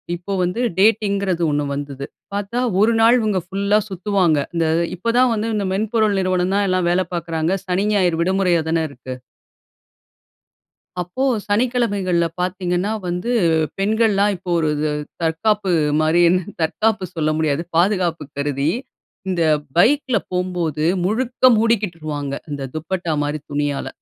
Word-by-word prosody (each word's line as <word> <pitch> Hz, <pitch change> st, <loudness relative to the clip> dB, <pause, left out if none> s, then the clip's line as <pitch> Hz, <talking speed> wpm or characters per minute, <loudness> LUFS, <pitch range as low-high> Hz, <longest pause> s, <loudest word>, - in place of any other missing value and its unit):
இப்ப 185 Hz, +3 st, -5 dB
வந்து, 180 Hz, +7 st, -1 dB, 0.2 s
டேட்டிங்கிறது 200 Hz, -4 st, +2 dB
ஒண்ணு 145 Hz, 0 st, 0 dB
வந்துது. 140 Hz, -1 st, -5 dB, 0.3 s
பாத்தா, 205 Hz, +4 st, -2 dB, 0.2 s
ஒரு 230 Hz, +2 st, +4 dB
நாள் 235 Hz, +2 st, +6 dB
இவங்க 210 Hz, -4 st, 0 dB
ஃபுல்லா 200 Hz, +2 st, +1 dB
சுத்துவாங்க. 185 Hz, -4 st, +1 dB, 0.2 s
இந்த 165 Hz, -1 st, +1 dB, 0.3 s
இப்பதான் 235 Hz, +5 st, +2 dB
வந்து 220 Hz, +1 st, -2 dB
இந்த 205 Hz, -2 st, -1 dB
மென்பொருள் 215 Hz, 0 st, +1 dB
நிறுவனம் 185 Hz, 0 st, 0 dB
தான், 205 Hz, 0 st, +2 dB
எல்லாம் 185 Hz, -1 st, +1 dB
வேல 185 Hz, +1 st, +2 dB
பாக்குறாங்க. 165 Hz, +1 st, -1 dB
சனி, 185 Hz, +2 st, 0 dB
ஞாயிறு 180 Hz, -5 st, +2 dB
விடுமுறையா 180 Hz, -1 st, +2 dB
தான 165 Hz, 0 st, +1 dB
இருக்கு. 130 Hz, -1 st, -8 dB, 1.9 s
அப்போ 180 Hz, +10 st, -4 dB, 0.2 s
சனிக்கிழமைகள்ல 205 Hz, -6 st, +1 dB, 0.2 s
பாத்தீங்கன்னா 180 Hz, +1 st, -1 dB, 0.2 s
வந்து, 180 Hz, +7 st, -2 dB, 0.5 s
பெண்கள்லாம் 210 Hz, -1 st, +2 dB
இப்போ 180 Hz, +1 st, -9 dB
ஒருது 150 Hz, -1 st, 0 dB, 0.3 s
தற்காப்பு 190 Hz, +5 st, +1 dB, 0.3 s
மாரின்னு, 175 Hz, +3 st, +3 dB, 0.2 s
தற்காப்பு 215 Hz, +5 st, 0 dB
சொல்ல 155 Hz, -1 st, 0 dB
முடியாது, 155 Hz, 0 st, 0 dB
பாதுகாப்பு 175 Hz, -3 st, +1 dB
கருதி, 140 Hz, +1 st, 0 dB, 0.6 s
இந்த 175 Hz, -2 st, 0 dB, 0.4 s
பைக்ல 255 Hz, +5 st, +3 dB
போம்போது, 180 Hz, -4 st, -2 dB, 0.2 s
முழுக்க 245 Hz, +5 st, 0 dB
மூடிக்கிடுருவாங்க, 165 Hz, -11 st, -1 dB, 0.2 s
இந்த 140 Hz, -2 st, -4 dB
துப்பட்டா 165 Hz, +1 st, -2 dB
மாரி 150 Hz, +1 st, -2 dB
துணியால. 145 Hz, -1 st, -1 dB
185 Hz, 120 wpm, -20 LUFS, 165-210 Hz, 1.9 s, நாள்